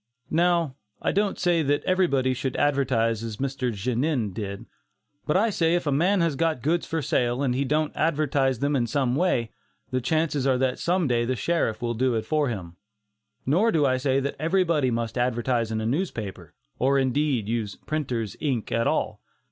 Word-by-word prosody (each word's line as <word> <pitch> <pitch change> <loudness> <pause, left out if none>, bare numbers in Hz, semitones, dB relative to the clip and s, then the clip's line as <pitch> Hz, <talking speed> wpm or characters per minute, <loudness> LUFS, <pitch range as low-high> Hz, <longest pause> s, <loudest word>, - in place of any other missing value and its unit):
Now, 170 -4 +2 0.2
I - - 0
don't 200 0 0
say 175 -2 +2
that 145 -1 +1
everybody 140 -9 +2
should 130 +1 -3
advertise 125 -6 +1
as 110 -2 -5
Mr. 130 -1 -2
Genin 120 - -1
did. 100 -1 -5 0.6
But 150 - +3
I 220 +3 +2
say 170 -3 +2
if 175 - -1
a 145 - +1
man 180 +7 +2
has 165 -4 +1
got 160 -4 0
goods 165 +4 +1
for 160 -2 -2
sale, 120 +2 0
and 130 -3 +1
he 135 +3 0
don't 150 +3 0
advertise 145 -4 +1
them 140 +1 +1
in 120 -3 +1
some 130 0 0
way, 130 -9 +1 0.4
the 130 0 0
chances 150 -1 0
are 130 -1 +3
that 130 0 0
some 175 -2 +1
day 120 -2 +1
the 130 +2 -1
sheriff 120 -3 -1
will 120 0 0
do 125 +1 +1
it 110 - -2
for 150 -3 +1
him. 90 -7 -6 0.7
Nor 185 - +3
do 155 -6 +2
I 130 -1 +2
say 135 +1 +1
that 140 +1 -3
everybody 165 -4 +2
must 115 0 -2
advertise 120 -1 0
in 110 - -1
a 110 - -3
newspaper, 110 - -3 0.2
or 135 +2 +3
indeed 135 -3 +1
use 110 -3 -2
"printers' 125 -9 -3
ink" 130 -7 -2
at 115 0 +1
all. - - -1
135 Hz, 190 wpm, -25 LUFS, 120-155 Hz, 0.7 s, But